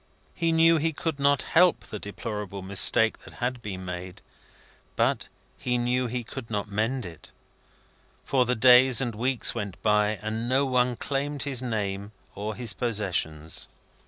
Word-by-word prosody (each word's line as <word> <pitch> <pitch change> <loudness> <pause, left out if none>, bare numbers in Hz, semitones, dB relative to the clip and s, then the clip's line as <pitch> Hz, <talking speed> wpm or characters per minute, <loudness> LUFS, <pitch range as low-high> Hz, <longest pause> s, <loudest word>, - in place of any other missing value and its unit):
He 165 -1 0
knew 165 0 +5
he 160 +1 0
could 155 -1 -3
not 140 -1 +3
help 180 +1 +3
the 105 - -8
deplorable 100 -2 -6
mistake 100 +3 +4
that - - -15
had 125 0 -3
been 95 -3 -6
made, 90 0 -7 0.7
but - - +1 0.3
he 125 0 0
knew 125 +1 0
he 120 +1 -3
could 120 0 -9
not 105 -2 -2
mend 110 +4 -1
it; 85 -3 -11 1.0
for 130 -3 +2
the 125 - +1
days 125 +2 +6
and 120 -3 -1
weeks 125 +3 0
went 100 -3 -5
by, 105 0 +2
and 110 +2 -3
no 135 +2 +3
one 125 -1 +1
claimed 140 +3 -3
his 135 -4 -1
name 105 -4 -3 0.2
or 105 +2 -5
his 120 -3 0
possessions. 90 -9 -2
120 Hz, 160 wpm, -26 LUFS, 105-130 Hz, 1.0 s, days